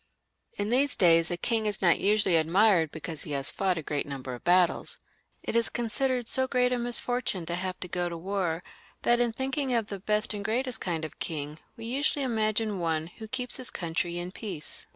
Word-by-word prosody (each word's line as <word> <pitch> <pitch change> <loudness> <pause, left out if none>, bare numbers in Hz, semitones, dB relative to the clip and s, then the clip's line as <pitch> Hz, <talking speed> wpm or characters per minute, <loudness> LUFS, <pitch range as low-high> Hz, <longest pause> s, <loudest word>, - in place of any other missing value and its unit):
Li 205 - -1
these 255 +4 +4
days 165 -5 +5
a 175 - -2
king 220 +4 0
is 205 - 0
not 175 -3 +4
usually 205 -3 +3
admired 170 +1 +4
because 160 0 -4
he 150 - -5
has 140 -1 +3
fought 190 -2 0
a 160 - -4
great 145 0 -2
number 135 -2 -5
of 120 - -9
battles. 180 0 +3 0.5
It - - -3
is 235 -1 +3
considered 245 +1 -1
so 260 +2 +1
great 250 -1 +2
a 245 - 0
misfortune 240 -5 +1
to 170 - -4
have 185 +1 -3
to 180 - -4
go 175 0 -2
to 170 - -5
war, 180 -2 -2 0.4
that 240 0 +4
in 240 -1 +2
thinking 265 +2 -1
of 225 -2 0
the 200 - -5
best 210 +3 0
and 205 -1 -4
greatest 245 +2 -2
kind 165 -3 -2
of 155 - -10
king 150 -1 -5 0.2
we 225 - -7
usually 275 +3 0
imagine 215 -3 0
one 160 -2 0 0.2
who 220 - -6
keeps 250 +1 0
his 255 -1 -3
country 170 0 -3
in 175 +1 -4
peace. 185 -8 -4
200 Hz, 210 wpm, -28 LUFS, 170-235 Hz, 0.5 s, days